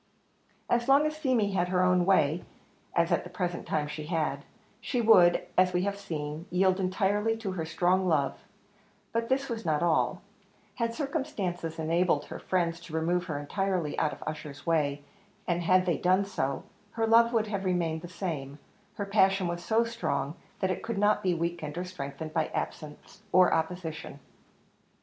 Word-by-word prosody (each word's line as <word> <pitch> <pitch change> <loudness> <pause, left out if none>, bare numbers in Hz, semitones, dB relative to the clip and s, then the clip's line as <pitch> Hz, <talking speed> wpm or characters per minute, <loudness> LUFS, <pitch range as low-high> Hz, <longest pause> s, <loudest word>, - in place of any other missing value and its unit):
As 240 0 +1
long 280 +2 +6
as 305 0 -1
Feemy 255 -9 +1
had 180 -2 +1
her 180 0 +2
own 180 0 +3
way, 160 -3 +3 0.5
as 170 0 +2
at - - +2
the 180 - -9
present 180 -1 -3
time 150 -1 0
she 150 0 -6
had, 155 -4 -1 0.4
she 245 +1 -2
would, 185 -7 +6
as 185 0 +4
we 180 0 +1
have 200 0 -1
seen, 155 -2 -5
yield 185 +1 +2
entirely 205 +4 +1
to 215 -4 -4
her 170 -4 -3
strong 180 +3 +1
love; 150 -5 +2 0.8
but 230 0 -1
this 270 +1 +1
was 230 -2 -4
not 155 -1 +1
all; 170 -2 +1 0.5
had 230 -1 -1
circumstances 225 - -3
enabled 165 -1 +1
her - - -8
friends 170 -2 0
to 170 -2 -12
remove 175 +2 +1
her 155 -5 -3
entirely 175 +1 -1
out 155 - +1
of - - -9
Ussher's 150 -2 -6
way, 145 -4 +1 0.4
and 175 0 0
had 185 +2 +4
they 170 -6 0
done 185 +2 +3
so, 140 -9 -2 0.3
her 225 -1 0
love 230 +1 +5
would 225 -2 +2
have 200 -2 -3
remained 170 -4 0
the 175 - -7
same; 160 -6 -5 0.4
her 200 - -3
passion 195 -1 +3
was 175 0 -4
so 225 +5 +3
strong, 150 -12 -2 0.3
that 190 -1 +1
it - - -3
could 230 -2 -4
not 210 +1 +3
be 185 -3 +1
weakened 170 -2 -3
or 180 - -1
strengthened 155 -3 -6
by 160 -2 +1
absence 155 +6 -6
or 185 -1 +5
opposition. 160 -3 -3
180 Hz, 175 wpm, -29 LUFS, 160-200 Hz, 0.8 s, long